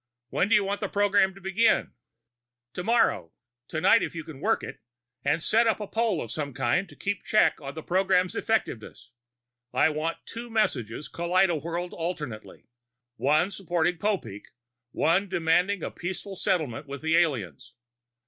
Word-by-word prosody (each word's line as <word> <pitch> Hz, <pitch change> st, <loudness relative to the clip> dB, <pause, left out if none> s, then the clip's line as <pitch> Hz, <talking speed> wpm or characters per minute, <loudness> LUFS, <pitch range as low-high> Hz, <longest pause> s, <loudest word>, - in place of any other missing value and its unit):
When 195 Hz, -, +1 dB
do -, -, +6 dB
you 210 Hz, -, +4 dB
want 200 Hz, +1 st, -2 dB
the -, -, -2 dB
program 200 Hz, -1 st, +3 dB
to 195 Hz, -, -14 dB
begin?" 195 Hz, +5 st, +2 dB, 0.8 s
"Tomorrow. 220 Hz, -, +1 dB, 0.3 s
Tonight, 160 Hz, -1 st, +4 dB
if -, -, -3 dB
you 160 Hz, -, -4 dB
can 155 Hz, -4 st, -10 dB
work 220 Hz, +8 st, +1 dB
it. -, -, -7 dB, 0.4 s
And 160 Hz, +2 st, +1 dB
set 230 Hz, +2 st, +3 dB
up 220 Hz, -, +2 dB
a 210 Hz, -, -3 dB
poll 225 Hz, +2 st, 0 dB
of 115 Hz, -, -8 dB
some 140 Hz, -1 st, -4 dB
kind 175 Hz, +10 st, 0 dB
to -, -, -14 dB
keep 200 Hz, -2 st, -3 dB
check 215 Hz, -, +3 dB
on 140 Hz, 0 st, -7 dB
the 160 Hz, -, -6 dB
program's 185 Hz, 0 st, +2 dB
effectiveness. 120 Hz, -, -2 dB, 0.6 s
I -, -, +3 dB
want 155 Hz, +2 st, -2 dB
two 235 Hz, +1 st, -7 dB
messages 145 Hz, -, -1 dB
kaleidowhirled 170 Hz, -1 st, 0 dB
alternately: 150 Hz, -10 st, -6 dB, 0.5 s
one 155 Hz, +7 st, +2 dB
supporting 175 Hz, -3 st, -1 dB
Popeek, 165 Hz, -, -2 dB, 0.5 s
one 180 Hz, +9 st, +2 dB
demanding 175 Hz, +3 st, +1 dB
a -, -, -3 dB
peaceful 190 Hz, +2 st, -6 dB
settlement 155 Hz, -8 st, -1 dB
with 140 Hz, +1 st, -7 dB
the 160 Hz, +1 st, +2 dB
aliens. 125 Hz, -, 0 dB
175 Hz, 155 wpm, -27 LUFS, 155-200 Hz, 0.8 s, do